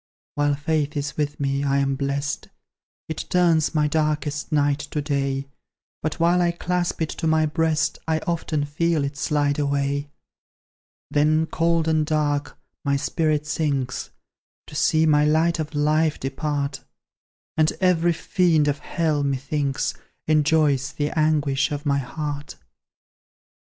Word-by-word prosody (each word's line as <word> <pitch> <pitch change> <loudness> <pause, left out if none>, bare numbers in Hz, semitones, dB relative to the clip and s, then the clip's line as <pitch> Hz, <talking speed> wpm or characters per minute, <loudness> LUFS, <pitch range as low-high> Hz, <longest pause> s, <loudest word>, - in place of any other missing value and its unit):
While 145 0 +1
Faith 150 0 -1
is 145 0 -3
with 145 -1 -2
me, 140 0 0
I 140 -1 +1
am 140 0 +1
blest; 140 +1 -2 0.6
It 160 - -4
turns 170 -3 +3
my 150 -1 +3
darkest 150 -1 -1
night 145 -1 +2
to 150 - -2
day; 140 -2 -1 0.6
But 155 +2 -3
while 175 +2 +3
I 175 - +3
clasp 175 -1 -1
it 155 - -3
to 165 - -3
my 160 0 +3
breast, 155 0 0
I 160 -1 +2
often 160 -3 -1
feel 160 +1 0
it 140 +1 -3
slide 145 0 0
away. 140 0 0 1.0
Then, 155 +2 +3
cold 165 0 +1
and 155 -1 +2
dark, 150 -2 -1 0.3
my 140 -1 +1
spirit 150 +1 0
sinks, 140 -5 -2 0.6
To - - -14
see 160 0 +3
my 150 -1 +4
light 160 +3 +2
of 155 0 -4
life 150 +1 +2
depart; 140 +1 -3 0.7
And 155 0 +3
every 175 -2 +3
fiend 165 -3 +2
of 145 0 0
Hell, 155 -3 0
methinks, 140 0 -1 0.3
Enjoys 150 -3 +2
the 145 0 -1
anguish 150 -4 +1
of 145 0 -4
my 140 -1 +2
heart. 145 +2 -5
150 Hz, 140 wpm, -23 LUFS, 145-160 Hz, 1.0 s, my